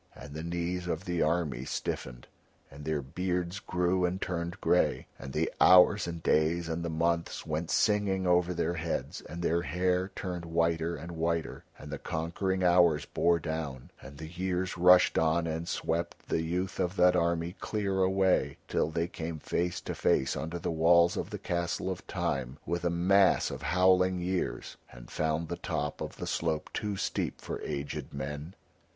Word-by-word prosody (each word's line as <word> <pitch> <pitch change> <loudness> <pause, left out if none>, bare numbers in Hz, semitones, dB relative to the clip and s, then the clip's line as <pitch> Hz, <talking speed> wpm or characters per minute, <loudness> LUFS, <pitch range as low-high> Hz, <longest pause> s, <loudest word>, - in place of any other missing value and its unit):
And 70 +2 -10
the 80 - -5
knees 85 +2 -3
of 85 +1 -3
the 90 -1 -1
army 75 -5 0
stiffened, - - -4 0.5
and 70 +1 -10
their 80 -3 -1
beards 90 +5 -2
grew 90 0 0
and 90 +1 0
turned 85 -2 -3
grey, - - +2
and 70 - -7
the - - -1
hours 95 +2 +7
and 85 -1 -6
days 80 +2 +2
and 80 +1 -2
the 85 - -2
months 85 +1 -1
went 80 +2 -2
singing 100 -3 +2
over 90 0 +3
their 85 -1 -1
heads, 85 -1 -3
and 85 +2 -7
their 85 +1 +2
hair 90 +4 0
turned 90 -2 -4
whiter 85 0 0
and 85 +4 -8
whiter, 85 0 -2
and 75 - -10
the 75 - -4
conquering 90 +4 -2
hours 85 -4 +4
bore 85 0 +2
down, 80 -6 -5
and 70 +1 -11
the 80 - -7
years 90 +2 -2
rushed 90 +1 +6
on 80 +1 +2
and 80 +1 -3
swept 85 +1 -3
the 80 - +1
youth 90 +3 -2
of 90 0 0
that 90 -1 +5
army 85 0 0
clear 100 -3 -1
away 95 0 +2
till - - 0
they 80 +1 -1
came 80 -1 -5
face 85 +3 -1
to - - -4
face 65 - +1
under 80 +2 -4
the 85 - -3
walls 85 +1 +4
of - - -3
the - - -5
castle 85 +2 -2
of 90 - -7
Time 65 0 -2
with 85 0 -2
a 85 - +2
mass 95 +3 +3
of - - -6
howling 90 +1 +3
years, 90 +1 -3
and - - -13
found 80 +1 -1
the - - -4
top 75 0 -3
of - - -5
the - - -6
slope 80 -2 -2
too 105 -2 -2
steep - - -2
for - - -6
aged 70 -1 -4
men. 75 +5 -6
85 Hz, 180 wpm, -30 LUFS, 80-90 Hz, 0.5 s, hours